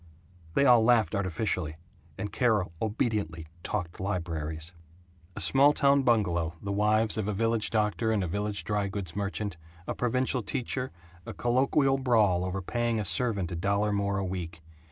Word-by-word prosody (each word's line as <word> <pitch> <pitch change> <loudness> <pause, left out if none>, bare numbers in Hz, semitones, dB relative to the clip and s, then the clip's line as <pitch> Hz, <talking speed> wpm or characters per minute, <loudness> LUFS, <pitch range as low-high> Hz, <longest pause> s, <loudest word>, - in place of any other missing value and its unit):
They 140 - +4
all 120 -3 +6
laughed 115 -7 +3
artificially, 95 -4 -1 0.4
and 105 - -4
Carol 105 -6 +1
obediently 105 -7 -1 0.2
"talked 90 -4 -3
libraries." 85 -3 -3 0.6
A - - -5
small 140 +2 +5
town 140 -1 +4
bungalow, 90 -10 +1
the 100 - -4
wives 105 +2 +2
of 105 - -2
a 105 - -1
village 115 +1 +1
doctor 110 +1 0
and 105 -3 +1
a - - -2
village 105 +3 -2
dry 105 -1 -1
goods 95 -4 -6
merchant, 100 -2 -3 0.3
a - - -2
provincial 125 +1 0
teacher, 125 +3 -3 0.4
a - - -6
colloquial 135 +3 +2
brawl 110 -9 +3
over 95 +1 -3
paying 120 +3 -1
a 105 - -2
servant 100 -5 +1
a - - -3
dollar 100 +4 0
more 100 -1 0
a 100 - -1
week. 85 -3 -5
105 Hz, 160 wpm, -28 LUFS, 95-115 Hz, 0.6 s, all